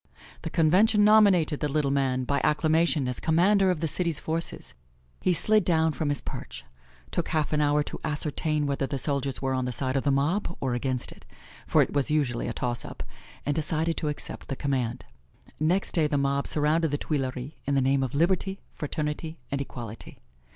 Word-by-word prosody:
The 165 - -4
Convention 190 +7 +4
nominated 195 -8 +5
the 150 - 0
little 145 -2 +1
man 130 -2 0
by 140 +2 0
acclamation 155 -2 +2
as 125 - -3
commander 190 +4 +3
of 175 -4 -1
the 165 - 0
city's 170 0 +3
forces. 160 - -3 0.5
He 185 - +2
slid 215 +4 +6
down 160 -2 +2
from 150 +1 -2
his 145 - -1
perch, - - -8 0.5
took - - -1
half 155 -1 -1
an 150 - +2
hour 145 0 +2
to - - -7
ascertain 150 0 -1
whether 140 -1 -1
the 140 - -3
soldiers 140 -1 -1
were 135 0 0
on 130 -1 -1
the 125 - -2
side 130 +1 -2
of 135 - +2
the 140 - 0
mob 160 +7 0
or 130 -2 -1
against 125 0 -2
it - - -15 0.4
for - - +4
it - - -6
was 145 +1 +1
usually 140 -6 0
a - - -2
toss 120 -1 -2
up - - -8 0.4
and 145 - +1
decided 160 +2 -1
to 155 - -2
accept 150 - -5
the 135 - -3
command. 130 -4 -2 0.5
Next 175 +6 +1
day 160 -3 +2
the 145 - 0
mob 140 0 0
surrounded 155 +2 +1
the 145 - -1
Tuileries 135 -3 -3 0.2
in 140 - +1
the - - +4
name 135 +1 +2
of 130 0 -3
Liberty, 190 +5 +1
Fraternity 150 +2 -4
and 140 0 -1
Equality. 115 -5 -8
150 Hz, 195 wpm, -27 LUFS, 135-165 Hz, 0.5 s, slid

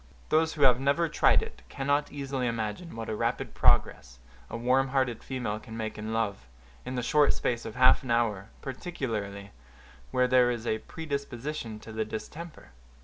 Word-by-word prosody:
Those 160 +1 +3
who 150 - 0
have 125 -2 +7
never 140 +5 +2
tried 150 - +4
it - - -9
cannot 145 +2 0
easily 135 -3 -2
imagine 115 +8 -3
what 115 0 -5
a 110 - -2
rapid - - -1
progress - - +2 0.3
a - - -4
warm 130 +3 +3
hearted 130 -3 0
female 125 -5 -3
can 110 0 -9
make 110 -1 -3
in 110 +1 -5
love, 105 - -1 0.4
in 130 - -3
the 125 - -1
short 150 +3 +4
space 120 -1 -1
of 110 - -6
half 130 +3 +6
an 130 - -8
hour, 110 -4 +1
particularly 110 - -4 0.6
where 125 0 +2
there 125 -1 +5
is 120 -1 -3
a 110 -1 0
predisposition 140 -6 -5
to 110 - -10
the 110 0 -1
distemper. 150 - -8
125 Hz, 175 wpm, -29 LUFS, 110-140 Hz, 0.6 s, have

